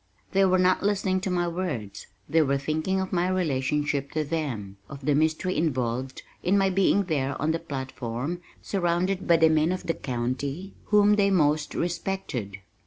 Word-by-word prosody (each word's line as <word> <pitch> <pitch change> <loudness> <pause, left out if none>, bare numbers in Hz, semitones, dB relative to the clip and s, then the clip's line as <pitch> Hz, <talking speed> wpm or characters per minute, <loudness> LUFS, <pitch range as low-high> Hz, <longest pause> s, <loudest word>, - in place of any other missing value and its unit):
They 195 0 +3
were 185 0 +4
not 185 0 +3
listening 195 -2 +1
to 190 - -2
my 175 -1 0
words, 160 - -4 0.2
they 165 0 +3
were 140 -2 +2
thinking 155 +7 -1
of 190 0 -3
my 175 0 +2
relationship 145 -4 0
to 155 - 0
them, 130 -11 -4
of 140 -1 -9
the 150 - +3
mystery 160 +5 +1
involved 130 -4 -1 0.2
in 190 +3 +2
my 195 -1 +3
being 195 +1 +3
there 140 -6 -1
on 155 +2 +1
the 165 - -1
platform 135 +1 -4 0.2
surrounded 185 0 0
by 170 - +6
the 160 0 +5
men 155 +1 +3
of 185 - -3
the 165 - 0
county 135 +9 -3
whom 210 0 +4
they 200 -1 +4
most 150 -5 +2
respected. 170 - -3
160 Hz, 175 wpm, -26 LUFS, 140-185 Hz, 0.2 s, by